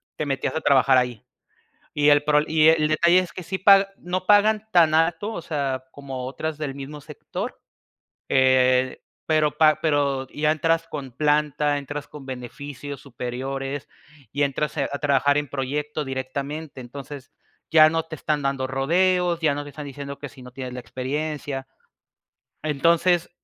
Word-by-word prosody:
te 155 Hz, -, -3 dB
metías 135 Hz, -2 st, -2 dB
a 160 Hz, -, -1 dB
trabajar 135 Hz, -1 st, +4 dB
ahí. 125 Hz, -3 st, -1 dB, 0.7 s
Y 145 Hz, 0 st, +4 dB
el 145 Hz, 0 st, +5 dB
pro 150 Hz, 0 st, +3 dB
y 155 Hz, 0 st, +4 dB
el 160 Hz, -1 st, +4 dB
detalle 170 Hz, +3 st, +4 dB
es 185 Hz, -, -6 dB
que 185 Hz, -, -7 dB
sí 190 Hz, +3 st, -4 dB
paga, 195 Hz, +1 st, +6 dB
no 185 Hz, +1 st, -3 dB
pagan 210 Hz, +1 st, +4 dB
tan 165 Hz, -4 st, +5 dB
alto, 165 Hz, +6 st, +1 dB
o 170 Hz, -, -5 dB
sea, 140 Hz, -5 st, -2 dB
como 135 Hz, -3 st, -7 dB
otras 155 Hz, +3 st, -4 dB
del 145 Hz, -3 st, -4 dB
mismo 140 Hz, +2 st, -8 dB
sector, -, -, -7 dB, 0.7 s
eh, 130 Hz, -1 st, +3 dB, 0.3 s
pero 155 Hz, -1 st, +3 dB
pa 155 Hz, -1 st, +5 dB
pero 140 Hz, -4 st, +1 dB
ya 150 Hz, +1 st, +1 dB
entras 165 Hz, +1 st, +1 dB
con 140 Hz, -5 st, -6 dB
planta, 150 Hz, +1 st, +1 dB
entras 145 Hz, +1 st, -6 dB
con 145 Hz, -3 st, -11 dB
beneficios 135 Hz, +2 st, -7 dB
superiores 135 Hz, +1 st, -5 dB, 0.4 s
y 145 Hz, +1 st, 0 dB
entras, 145 Hz, +2 st, -1 dB
eh, 140 Hz, -, +1 dB
a 140 Hz, -, -3 dB
trabajar 145 Hz, 0 st, +2 dB
en 150 Hz, 0 st, -1 dB
proyecto 145 Hz, +3 st, -3 dB
directamente, 135 Hz, +3 st, -5 dB
entonces 135 Hz, +2 st, -9 dB, 0.4 s
ya 155 Hz, -1 st, +8 dB
no 165 Hz, 0 st, -1 dB
te 160 Hz, 0 st, -8 dB
están 150 Hz, 0 st, -1 dB
dando 135 Hz, -1 st, -1 dB
rodeos, 175 Hz, +6 st, +1 dB
ya 155 Hz, -3 st, +3 dB
no 145 Hz, +1 st, -4 dB
te 145 Hz, -, -10 dB
están 150 Hz, +1 st, -8 dB
diciendo 140 Hz, 0 st, -7 dB
que 145 Hz, -, -7 dB
si 130 Hz, -, -15 dB
no 125 Hz, 0 st, -11 dB
tienes 130 Hz, -1 st, -7 dB
la 125 Hz, -, -5 dB
experiencia. 135 Hz, +1 st, -4 dB, 1.0 s
Entonces 170 Hz, +4 st, +2 dB
145 Hz, 165 wpm, -24 LUFS, 135-155 Hz, 1.0 s, ya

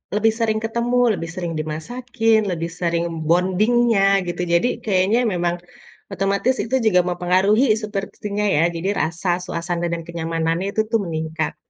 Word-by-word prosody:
lebih 220 Hz, +1 st, +3 dB
sering 220 Hz, -1 st, +1 dB
ketemu, 235 Hz, +2 st, -1 dB, 0.2 s
lebih 165 Hz, -4 st, -5 dB
sering 175 Hz, -2 st, -3 dB
dimasakin, 225 Hz, +9 st, 0 dB
lebih 165 Hz, -1 st, -3 dB
sering 170 Hz, -1 st, 0 dB, 0.2 s
bounding-nya, 200 Hz, +6 st, +3 dB, 0.3 s
gitu, 175 Hz, 0 st, -3 dB
jadi 170 Hz, +7 st, +3 dB, 0.2 s
kayaknya 200 Hz, +2 st, +2 dB
memang 175 Hz, -1 st, 0 dB, 0.6 s
otomatis 195 Hz, +6 st, +1 dB
itu 245 Hz, +3 st, -1 dB
juga 180 Hz, -4 st, +4 dB
mempengaruhi 185 Hz, +7 st, +2 dB, 0.2 s
sepertinya 205 Hz, 0 st, -4 dB
ya, 150 Hz, -, +3 dB
jadi 170 Hz, +4 st, -2 dB
rasa, 170 Hz, +3 st, -2 dB, 0.2 s
suasana, 175 Hz, 0 st, -3 dB
dan 170 Hz, -, -3 dB
kenyamanannya 165 Hz, +1 st, -2 dB
itu 220 Hz, -, +1 dB
tuh 225 Hz, -, +3 dB
meningkat. 160 Hz, -1 st, -3 dB
185 Hz, 140 wpm, -21 LUFS, 170-220 Hz, 0.6 s, juga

